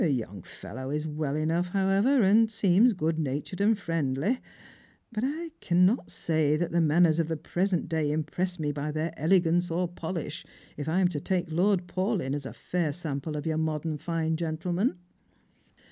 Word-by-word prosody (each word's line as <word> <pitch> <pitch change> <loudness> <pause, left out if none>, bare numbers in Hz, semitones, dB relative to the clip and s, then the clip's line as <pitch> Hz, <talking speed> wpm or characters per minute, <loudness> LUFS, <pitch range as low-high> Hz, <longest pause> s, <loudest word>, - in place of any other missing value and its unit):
The 175 - +3
young 105 -7 -3
fellow 115 +10 -8
is 150 +2 -2
well 150 -2 -2
enough, 165 +3 0
however, 195 +7 +3
and 220 +4 +5
seems 215 +2 +4
good 160 -3 -1
natured 150 +6 -3
and 215 +1 +4
friendly; 165 - -1 0.7
but 220 0 -3
I 320 +5 -2
cannot 180 +7 +3
say 155 -2 +1
that 175 +1 -1
the 170 0 +2
manners 165 +1 +4
of 165 - +1
the 160 -1 -2
present 180 +3 -1
day 160 -3 0
impress 175 +4 -2
me 150 -3 -1
by 145 +1 -3
their 155 +2 -2
elegance 175 +1 +2
or 175 +2 0
their 175 - -8
polish, 165 -2 -4 0.3
if 150 +1 -4
I 180 +4 +2
am 185 - +5
to 155 -5 -3
take 180 +1 -1
Lord 180 +2 +2
Paulyn 185 - -1
as 140 -2 -3
a - - -8
fair 175 -4 -1
sample 150 -1 -4
of 150 - -5
your 160 -1 0
modern 155 -1 -2
fine 160 0 -1
gentleman." 175 +6 -1
165 Hz, 180 wpm, -28 LUFS, 155-185 Hz, 0.7 s, and